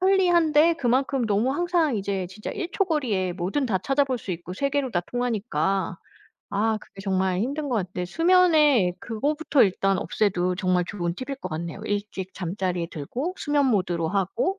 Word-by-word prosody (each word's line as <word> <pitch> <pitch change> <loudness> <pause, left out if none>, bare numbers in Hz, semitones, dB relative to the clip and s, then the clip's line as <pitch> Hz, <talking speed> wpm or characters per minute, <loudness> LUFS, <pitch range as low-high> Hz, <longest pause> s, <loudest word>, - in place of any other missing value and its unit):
편리한데 345 -4 +4
그만큼 260 -1 +1
너무 215 +5 +1
항상 335 -4 +1
이제 195 -2 -2
진짜 210 +3 -7
1 360 -4 -4
초 395 - +2
거리에 225 - 0
뭐든 190 +10 -1
다 200 -6 +1
찾아 275 +9 +1
볼 260 -3 -2
수 200 - -7
있고 175 +1 -5
세계로 275 +4 -1
다 175 - +1
통하니까 195 -7 -1 0.5
아 215 +2 +1
그게 195 - -13
정말 190 -1 0
힘든 280 +6 -2
것 240 - +1
같아요. 180 -2 -3
수면에 310 - +4
그거부터 285 +5 +1
일단 195 -1 +2
없애도 185 -1 0
정말 185 -2 +1
좋은 175 -4 -3
팁일 265 +6 -5
것 185 - -4
같네요. 170 +4 -5
일찍 200 -2 -4
잠자리에 180 -1 -2
들고 255 - -4
수면 290 -2 +1
모드로 180 -8 +1
하고 200 - -1
215 Hz, 345 characters per minute, -25 LUFS, 185-285 Hz, 0.5 s, 편리한데